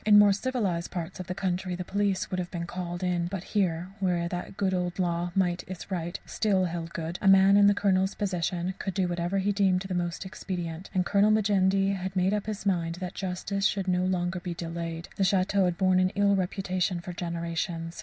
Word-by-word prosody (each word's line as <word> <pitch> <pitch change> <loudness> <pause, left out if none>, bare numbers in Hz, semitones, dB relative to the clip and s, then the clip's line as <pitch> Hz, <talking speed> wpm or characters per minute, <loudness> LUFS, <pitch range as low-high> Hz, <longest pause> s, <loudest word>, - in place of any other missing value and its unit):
In 210 -1 +7
more 205 -1 +7
civilized 200 -7 -1
parts 175 +1 -5
of 185 - -6
the 180 - -3
country 185 -1 -2
the 180 - -4
police 200 -1 0
would 185 - -1
have 175 -1 -3
been 170 -2 -4
called 175 0 -5
in, 175 -1 0
but 185 0 -4
here, 180 -4 0
where 175 -3 +1
that 180 +2 -5
good 190 -2 +1
old 180 -1 -1
law, 175 -1 0
"Might 180 -2 +1
is 185 +1 -8
right," 175 -2 -3
still 195 -4 +1
held 170 -1 -4
good, 165 +1 -4
a 195 - +1
man 195 +1 +7
in 205 0 +7
the 205 - +5
Colonel's 190 -1 +2
position 180 -2 -1
could 195 -2 -3
do 190 -3 +1
whatever 175 +2 -1
he 195 +1 +1
deemed 195 -2 +2
most 175 0 -2
expedient, 180 -2 -5
and 180 -1 +2
Colonel 205 +2 +4
Majendie 195 -2 +3
had 190 0 -5
made 185 +2 +2
up 210 0 -2
his 210 -2 -4
mind 170 -4 0
that 180 0 -5
justice 195 +2 -1
should 195 -2 -2
no 180 0 +2
longer 185 0 0
be 175 -1 -5
delayed. 165 0 -5
The 195 - +2
château 190 +1 +3
had 175 -1 0
borne 185 -1 +3
an 185 0 +3
ill 200 0 +4
reputation 185 -1 -1
for 175 +1 -7
generations. 170 -1 -3
185 Hz, 215 wpm, -28 LUFS, 175-195 Hz, -, In